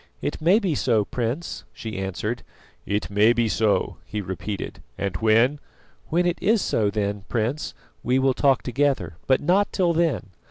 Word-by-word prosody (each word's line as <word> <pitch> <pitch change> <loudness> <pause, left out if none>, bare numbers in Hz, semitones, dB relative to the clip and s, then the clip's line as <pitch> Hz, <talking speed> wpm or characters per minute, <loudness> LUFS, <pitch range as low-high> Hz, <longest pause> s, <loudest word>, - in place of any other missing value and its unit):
"It - - -3
may 175 +6 +5
be 195 -7 0
so, 115 -6 +2
Prince," 125 +10 -3
she 110 -3 -6
answered. 95 +5 -3 0.5
"It 105 0 -1
may 105 +3 +5
be 120 -1 +1
so," 110 -1 +1
he 105 - -5
repeated, 95 +1 -5 0.2
"and 100 -3 -2
when 115 +7 +3 0.2
" - - -32
"When 175 +2 +2
it 175 -1 0
is 220 +2 +3
so, 105 - +1
then, 100 -1 -2
Prince, 120 +6 -1 0.3
we 125 +2 +1
will 135 0 +3
talk 135 -1 +3
together, 125 - 0
but 130 - +3
not 190 +6 +2
till 175 -3 +2
then. 155 - 0
120 Hz, 170 wpm, -24 LUFS, 105-150 Hz, 0.5 s, may